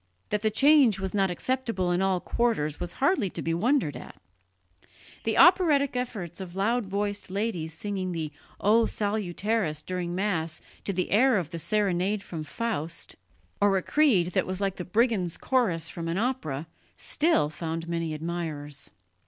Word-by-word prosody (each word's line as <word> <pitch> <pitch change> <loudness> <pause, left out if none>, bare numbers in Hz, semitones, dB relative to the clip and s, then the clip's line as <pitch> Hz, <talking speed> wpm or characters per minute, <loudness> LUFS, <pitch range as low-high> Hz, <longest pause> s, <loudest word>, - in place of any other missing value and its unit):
That 210 - 0
the 220 - +2
change 270 -3 +5
was 190 -1 -3
not 195 -2 +2
acceptable 210 -2 -1
in 175 +1 +1
all 190 -1 +2
quarters 175 -11 0
was 175 0 -4
hardly 275 - +2
to - - -5
be 165 - 0
wondered 220 - +1
at. 125 - -10 1.1
The 225 -1 +1
operatic 315 -7 +5
efforts 205 -9 -4
of 180 -1 -8
loud 220 +3 +1
voiced 205 +1 -2
ladies 185 -6 -2
singing 190 0 -3
the 160 -3 -3 0.3
O 225 +3 +4
Salutaris 205 -5 -1
during 180 -1 -3
Mass 170 -5 -1 0.3
to - - 0
the 185 -1 -2
air 245 +3 +5
of 170 -4 -3
the 170 - -4
Serenade 200 +1 +1
from 165 -5 -6
Faust, 170 -2 -4 0.5
or 200 -1 +4
a 185 - -2
Creed 225 - +3
that - - +1
was 185 0 -3
like 195 -1 -1
the 180 - -5
Brigands' 205 -4 +1
Chorus 225 -11 +1
from 165 -1 -5
an 165 +2 -1
opera, 195 - -2 0.3
still 300 - +1
found 165 +1 -4
many 165 -2 -2
admirers. 155 -3 -4
190 Hz, 160 wpm, -27 LUFS, 170-225 Hz, 1.1 s, change